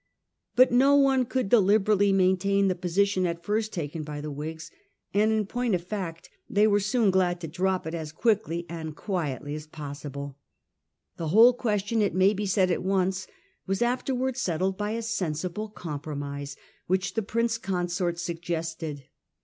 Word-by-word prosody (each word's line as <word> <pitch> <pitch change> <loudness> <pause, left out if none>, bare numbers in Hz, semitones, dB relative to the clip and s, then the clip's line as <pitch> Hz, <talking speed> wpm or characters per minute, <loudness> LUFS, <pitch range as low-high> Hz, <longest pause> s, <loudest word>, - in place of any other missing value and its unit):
But 255 0 +6
no 270 +3 +5
one 270 -2 +4
could 255 -1 -1
deliberately 205 -1 +4
maintain 195 +1 +3
the - - +2
posi 180 +2 +1
tion 185 -2 0
at 170 0 -4
first 215 +3 -1
taken 160 -1 -4
up - - -6
by 150 -1 -5
the 150 0 -5
Whigs; 160 +3 -6 0.4
and 210 +2 +3
in 215 -1 +1
point 240 0 0
of 175 - -3
fact 180 -4 -5 0.2
they 205 +1 +4
were 205 -1 +4
soon 210 +1 +2
glad 180 -2 +2
to 165 - -4
drop 185 +3 -1
it 160 - -4
as 160 -2 -4
quickly 195 -2 0
and 160 -2 -6
quietly 145 - -3
as 150 0 -6
possible. 140 -2 -7 0.8
The 165 - -3
whole 225 +9 +7
question, 220 -2 0
it 205 - +1
may 190 +2 +4
be 205 0 -2
said 190 -1 +2
at - - 0
once, 190 0 0 0.4
was 195 +4 +1
afterwards 255 +1 -1
settled 185 +2 0
by 205 +2 -2
a 230 0 -3
sensible 185 -1 -3
compromise 145 -5 -6 0.3
which 185 +1 0
the 225 - 0
Prince 230 +2 -1
Consort 180 -3 -1
suggested. 165 -3 -4
185 Hz, 170 wpm, -27 LUFS, 165-210 Hz, 0.8 s, whole